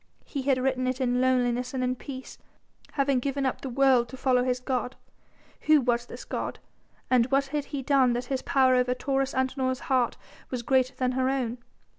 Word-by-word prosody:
He 280 - -4
had 265 -1 +2
written 255 0 0
it 255 +1 -1
in 250 -1 +1
loneliness 250 0 +1
and 255 - -1
in 250 0 +1
peace, 260 0 -9 0.5
having 275 -2 +2
given 275 +1 -2
up 260 - -1
the 270 - -5
world 255 -2 +3
to 260 - -9
follow 255 -1 +2
his 250 0 0
God. 250 0 -2 0.7
Who 310 -1 +7
was 240 -2 0
this - - -9
god? - - -4 0.5
and 245 -2 +4
what 275 +1 +2
had 295 -1 -1
he 280 -3 -5
done 265 -3 +3
that 245 +1 -2
his 260 0 -2
power 260 -1 +3
over 250 0 +2
Taurus 270 +1 -1
Antinor's 260 0 -1
heart 250 -2 +2 0.3
was 250 -2 -4
greater 260 +1 +2
than 255 -1 0
her 260 0 +1
own? 250 -3 -2
255 Hz, 195 wpm, -27 LUFS, 250-270 Hz, 0.7 s, Who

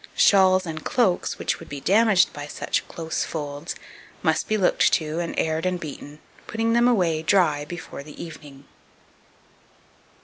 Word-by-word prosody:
Shawls 190 -2 +5
and 155 -2 -6
cloaks, 195 -8 +1
which - - -2
would 165 - -12
be 145 - -6
damaged 205 +3 +4
by 145 0 -7
such - - -2
close 160 -1 -3
folds, 145 +1 -5 0.5
must - - +1
be 215 - +1
looked 190 - +3
to, 155 0 0
and 170 -1 -4
aired 160 0 0
and 180 -1 -1
beaten, 150 -2 -8 0.3
putting 225 0 0
them 235 +1 +4
away 175 -10 +2
dry 160 -4 +2
before 175 -2 -8
the 150 +1 -12
evening. 145 -4 -10
165 Hz, 150 wpm, -24 LUFS, 150-190 Hz, 0.5 s, Shawls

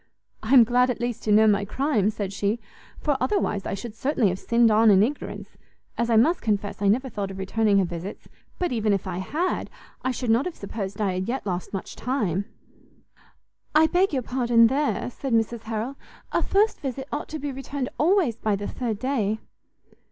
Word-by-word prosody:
"I 225 +5 +2
am 245 - +10
glad, 250 +2 +3
at 250 - -2
least, 240 -1 -3
to 215 - +1
know 215 +1 +6
my 205 -1 +3
crime," 220 -2 +1
said 205 -2 -4
she, 205 +3 -1 0.4
"for 295 -2 +1
otherwise 215 - 0
I - - -2
should 210 +3 -7
certainly 245 -2 +1
have 185 +1 -3
sinned 235 -1 +3
on 220 +1 +5
in 195 -1 +6
ignorance, 280 +6 -4 0.4
as 235 0 -1
I 230 - +3
must 310 +11 +4
confess 205 -2 -2
I 200 - +2
never 250 +7 +2
thought 205 -5 -4
of 190 - -8
returning 200 +2 +1
her 195 - +3
visits: 175 +3 -7 0.3
but 355 -2 -1
even 220 -3 +1
if 195 - -1
I 180 -1 -3
had, 315 - -2 0.3
I 260 - -1
should 250 -2 -1
not 235 +5 +3
have 360 - -4
supposed 200 -1 -6
I 200 -3 +1
had 185 +2 -3
yet 255 0 -3
lost 180 -2 -3
much 195 - -5
time." 205 - -1 1.3
"I 310 +1 +7
beg 365 +4 +2
your 265 -4 -1
pardon 240 -2 +3
there," 270 +1 0
said 270 0 -4
Mrs 225 0 +1
Harrel; 225 +5 -3 0.3
"a - - +1
first 420 +3 +2
visit 270 -1 -4
ought 295 - -3
to 315 - -4
be 290 -1 -4
returned 270 0 -4
always 335 - +3
by 215 -2 0
the 205 +1 -4
third 235 -5 -3
day." 220 -4 0
230 Hz, 205 wpm, -25 LUFS, 205-265 Hz, 1.3 s, am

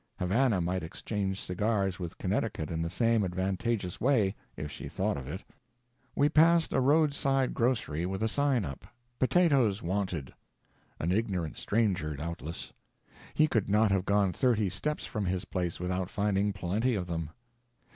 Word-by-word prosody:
Havana 100 +2 +2
might 90 +2 -1
exchange 95 +3 -3
cigars 95 0 -1
with 85 -1 -6
Connecticut 100 -4 -2
in 80 0 -2
the 85 - -1
same 115 +2 +2
advantageous 95 +2 -2
way, 110 -6 +3 0.2
if 75 -1 -5
she - - -7
thought - - -1
of 70 -2 -6
it. 95 +8 -6 0.7
We 145 - +4
passed 165 +2 +4
a 135 - +3
roadside 140 -2 +2
grocery 115 - 0
with 95 +3 -3
a - - +3
sign 135 -3 +1
up, 70 -3 -8 0.3
"Potatoes 130 - +3
Wanted." 90 -6 -2 0.7
An 85 - 0
ignorant 95 -6 -1
stranger, 100 -9 0
doubtless. 85 +2 -6 0.6
He 155 - +5
could 115 -9 0
not 105 +1 +4
have 95 -1 +1
gone 100 -2 +2
thirty 110 -5 +2
steps 150 - -3
from 105 -2 -3
his 90 0 -1
place 90 -3 -3
without 90 +1 -2
finding 105 -2 +1
plenty 100 +6 0
of 95 -3 -2
them. 80 -3 -3
100 Hz, 155 wpm, -30 LUFS, 90-115 Hz, 0.7 s, He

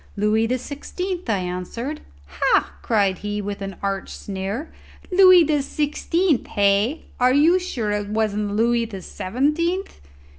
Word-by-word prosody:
"Louis 215 +2 +2
the 255 +2 0
Sixteenth," 350 +5 -5
I 210 - +2
answered. 185 - -4 0.2
"Ha!" 70 0 +1
cried 200 -5 +1
he, 205 +1 -3
with 205 0 -5
an 195 -1 -5
arch 195 -1 -2
sneer; 200 +9 -5 0.4
"Louis 370 -2 +8
the 300 -2 +1
Sixteenth, 300 +2 0
hey? 205 +8 +1
Are 250 +1 +4
you 325 +6 +5
sure 240 - -3
it 205 0 -2
wasn't 210 -1 -1
Louis 235 +1 +2
the 195 -5 -8
Seventeenth?" 300 - -1
225 Hz, 140 wpm, -22 LUFS, 200-300 Hz, 0.4 s, Louis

